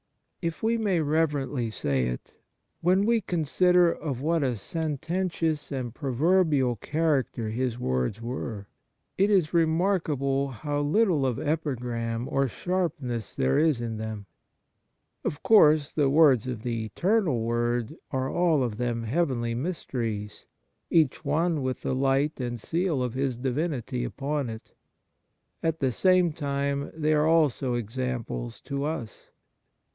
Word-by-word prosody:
If 165 +2 -3
we 225 +1 +2
may 200 -6 +1
reverently 145 -5 0
say 70 - 0
it, - - -6 0.5
when 185 +4 +3
we 230 0 +3
con 175 -5 -2
sider 180 +3 +4
of 140 -5 -4
what 165 +2 +1
a 130 -3 0
sententious 160 - -2
and 125 -4 -3
proverbial 145 -2 +2
character 140 -5 0
His 120 0 -1
words 65 - -1
were, 115 -3 -5 0.5
it 200 +2 +4
is 185 -7 +2
remarkable 160 -5 +1
how 145 +3 -3
little 165 0 +2
of 120 -3 -1
epigram 125 -6 -2
or 135 0 +1
sharpness 145 - -3
there 65 0 +2
is 155 -4 +3
78 120 - -4
Kindness 115 - -3
m 110 - -4
them. 110 -2 -5 1.0
Of 145 - -3
course 155 -9 +5
the 145 -3 +2
words 140 -5 +5
of 120 -4 -4
the 115 -2 -2
Eternal 175 - +1
Word 120 +3 -1
are 130 -1 -1
all 170 -6 +2
of 115 -4 -3
them 120 -1 -1
heavenly 120 -3 0
mysteries, 115 - -4 0.4
each 155 -6 +2
one 165 -1 +1
with 130 -1 -3
the - - -1
light 135 +3 +1
and 120 -2 -3
seal 165 - 0
of 125 -2 -2
His 130 -2 -1
Divinity 130 -1 -2
upon 140 -1 -2
it. 110 0 -9 0.9
At 165 -1 0
the 135 -2 +1
same 180 - +3
time 140 -2 -2
they 155 -1 +1
are 150 0 +3
also 140 -6 +2
examples 120 - -4
to 140 0 -3
us. 150 -8 -5
140 Hz, 140 wpm, -27 LUFS, 120-160 Hz, 1.0 s, course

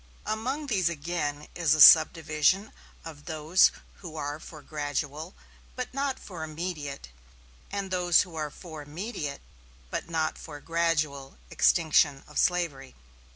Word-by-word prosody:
Among 255 +8 -2
these 190 - +1
again 150 -2 -3
is 165 -3 +2
a - - -3
subdivision 160 +5 +6 0.3
of 150 -3 -10
those 160 +2 +3 0.3
who 165 -4 -10
are 145 0 -4
for 155 -2 -12
gradual 150 +3 -4 0.4
but 255 0 -5
not 275 0 -1
for 175 -5 -8
immediate, 155 - -5 0.6
and 200 -1 -4
those 180 -2 +4
who 175 -3 -7
are 155 -1 -3
for 160 0 -10
immediate, 150 -1 -6 0.5
but - - -4
not 160 -1 -1
for 150 -3 -9
gradual 155 -4 -1
extinction 155 -4 +3
of 150 - -4
slavery. 160 -7 0
160 Hz, 130 wpm, -28 LUFS, 150-180 Hz, 0.6 s, subdivision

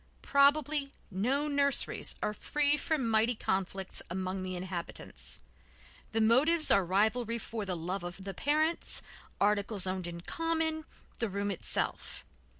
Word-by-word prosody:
Probably 280 0 +3 0.2
no 255 +10 +1
nurseries 280 -2 +2
are 210 - 0
free 295 +6 +2
from 295 -3 0
mighty 225 +2 +3
conflicts 190 -1 -2
among 185 +1 -2
the 185 0 -3
inhabitants. 170 - -6 0.7
The 225 - 0
motives 285 +9 +4
are 195 - +6
rivalry 220 +6 +1
for 225 -2 -5
the 185 -2 -2
love 180 +3 -3
of 175 +2 -7
the 195 0 -5
parents, 310 - 0 0.4
articles 205 -1 +2
owned 185 -1 -2
in 170 0 -6
common, 320 - -1 0.3
the 230 - 0
room 200 +1 -1
itself. 190 - -3
220 Hz, 135 wpm, -32 LUFS, 190-285 Hz, 0.7 s, are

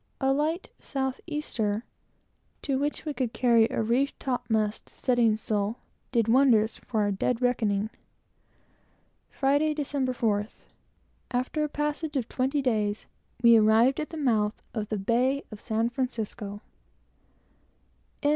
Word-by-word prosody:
A 270 0 +2
light 315 +6 -1
south 265 -2 -3
easter, 230 -9 -2 0.8
to 270 -2 0
which 290 +3 -2
we 300 - -2
could 255 -4 -2
carry 235 -3 +4
a - - -1
reefed 250 +5 0
topmast 220 -4 -1
studding 235 -4 +2
sail, 215 +1 -1 0.3
did 230 -3 +2
wonders 230 -3 +4
for 220 -4 -2
our 205 -1 +1
dead 225 +5 0
reckoning. 220 -4 +1 1.4
Friday, 285 +3 +1
December 280 -3 -1
4th, 210 -3 -1 0.7
after 255 +5 -1
a 300 - -1
passage 295 +1 -2
of 245 -3 -1
twenty 270 +2 0
days, 215 -4 0 0.4
we 235 -1 +8
arrived 225 +5 +4
at 305 - -3
the 325 - -7
mouth 220 -7 +1
of 215 -2 -3
the 215 - -1
bay 245 +7 +1
of 215 - -9
San 225 0 0
Francisco. 225 -5 -4
245 Hz, 130 wpm, -27 LUFS, 220-275 Hz, 1.4 s, we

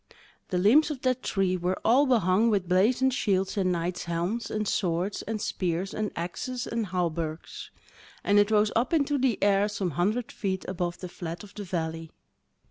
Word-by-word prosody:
The 180 - -1
limbs 240 - +5
of 285 -4 -5
that 255 -1 +1
tree 190 -2 0
were 180 +1 -1
all 265 +5 +5
behung 220 -2 +3
with 200 -5 +1
blazoned 240 +9 +3
shields 190 -6 0
and 190 -3 +1
knight's 175 +1 -2
helms, 175 +7 -2
and 215 -1 -2
swords, 180 +1 -1
and 220 +1 -4
spears, 185 -1 -2
and 215 -1 -2
axes, 240 +9 -4
and 230 -2 -2
hawberks; 170 -3 -3 0.5
and 205 0 +4
it 205 0 +4
rose 210 -1 +3
up 240 +7 +1
into 290 -2 +2
the 255 -5 +2
air 200 0 +4
some 200 -4 -2
hundred 210 - 0
feet 190 -3 -3
above 175 -2 -3
the 180 - -4
flat 170 0 -7
of 205 -1 -13
the 210 - -6
valley. 165 -2 -3
195 Hz, 180 wpm, -27 LUFS, 175-225 Hz, 0.5 s, limbs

